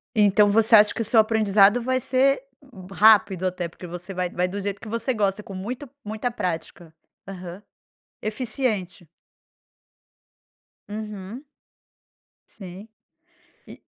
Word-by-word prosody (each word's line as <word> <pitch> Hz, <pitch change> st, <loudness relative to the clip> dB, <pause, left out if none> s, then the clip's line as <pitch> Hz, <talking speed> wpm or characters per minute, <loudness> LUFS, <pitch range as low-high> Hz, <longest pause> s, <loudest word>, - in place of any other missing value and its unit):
Então 205 Hz, -1 st, +4 dB
você 225 Hz, +2 st, +5 dB
acha 210 Hz, -1 st, +6 dB
que -, -, -4 dB
o -, -, -2 dB
seu 225 Hz, +1 st, +4 dB
aprendizado 215 Hz, 0 st, +4 dB
vai 255 Hz, +2 st, 0 dB
ser 265 Hz, +2 st, +1 dB, 0.5 s
rápido 200 Hz, -3 st, +4 dB
até, 180 Hz, -1 st, -3 dB
porque 175 Hz, +2 st, -11 dB
você 175 Hz, +3 st, -8 dB
vai 180 Hz, -1 st, -2 dB
vai 180 Hz, +1 st, -1 dB
do 195 Hz, +3 st, -5 dB
jeito 200 Hz, 0 st, -4 dB
que -, -, -10 dB
você 230 Hz, +4 st, -2 dB
gosta 205 Hz, -2 st, 0 dB
com 200 Hz, -, -11 dB
muita, 245 Hz, +9 st, -6 dB
muita 215 Hz, +3 st, -3 dB
prática. 175 Hz, -6 st, -5 dB, 0.3 s
Aham. 185 Hz, 0 st, -9 dB, 0.6 s
Eficiente. 215 Hz, -, -3 dB, 1.8 s
Uhum. 210 Hz, +3 st, -7 dB, 1.0 s
Sim, 190 Hz, +1 st, -11 dB, 0.8 s
e -, -, -13 dB
205 Hz, 125 wpm, -24 LUFS, 185-225 Hz, 1.8 s, acha